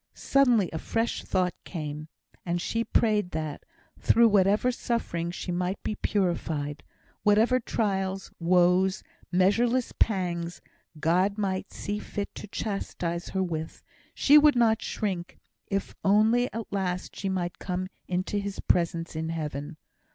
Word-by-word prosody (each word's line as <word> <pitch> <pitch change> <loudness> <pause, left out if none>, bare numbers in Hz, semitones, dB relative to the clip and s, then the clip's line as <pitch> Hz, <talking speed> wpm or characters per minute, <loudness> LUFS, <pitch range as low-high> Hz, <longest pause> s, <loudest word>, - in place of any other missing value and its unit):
Suddenly 245 -9 +3
a 160 - -2
fresh 230 +6 -1
thought 185 -2 0
came, 150 -2 -5 0.4
and 175 0 -1
she 230 +6 -1
prayed 210 -5 +2
that, 155 -2 -4 0.4
through 230 0 +5
whatever 205 +4 +3
suffering, 200 -9 -2
she 180 +1 -5
might 180 +2 -2
be - - -1
purified. 165 -8 -1 0.4
Whatever 220 +5 +4
trials, 195 -4 -2
woes, 180 +3 +3 0.3
measureless 230 +7 +2
pangs, 175 -5 0 0.4
God 185 +6 +2
might 190 -2 -2
see 205 +1 -4
fit 205 -1 -5
to - - -8
chastise 180 -5 -3
her 190 -1 0
with, 160 -3 -5 0.3
she 295 +2 +7
would 295 -1 +5
not 230 -2 +3
shrink, 185 -5 -3 0.3
if 195 -1 -2
only 220 +5 +4
at 225 -2 -6
last 185 -2 -2
she 195 - -3
might 175 -2 -2
come 185 0 -3 0.2
into 185 +3 -1
His 200 -1 -5
presence 170 -1 0
in 160 +1 -2
Heaven. 150 -1 -4
190 Hz, 135 wpm, -27 LUFS, 170-210 Hz, 0.4 s, she